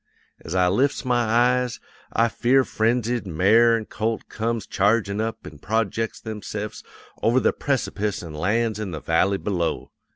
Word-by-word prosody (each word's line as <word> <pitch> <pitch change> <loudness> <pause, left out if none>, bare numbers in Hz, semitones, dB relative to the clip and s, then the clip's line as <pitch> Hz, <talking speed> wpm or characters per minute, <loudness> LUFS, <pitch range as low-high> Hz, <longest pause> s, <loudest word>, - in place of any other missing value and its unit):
As 80 - -5
I 90 -1 +4
lifts 135 +9 +1
my 120 -1 +2
eyes, 125 +2 +2 0.3
a 115 - +3
fear 130 +3 +3
frenzied 120 -1 0
mare 110 +8 +4
an' 110 - -5
colt 110 +2 -3
comes 115 -1 -2
chargin' 100 0 +1
up 115 0 -4
an' 75 -1 -10
projects 110 +2 -1
themse'fs 105 -1 -6 0.4
over 115 +4 +3
the - - +2
precipice 105 -8 -2
an' 80 -3 -8
lands 105 +7 0
in 105 -3 -3
the 80 -3 -5
valley 90 +6 +1
below. 90 -5 -2
110 Hz, 155 wpm, -23 LUFS, 100-120 Hz, 0.4 s, I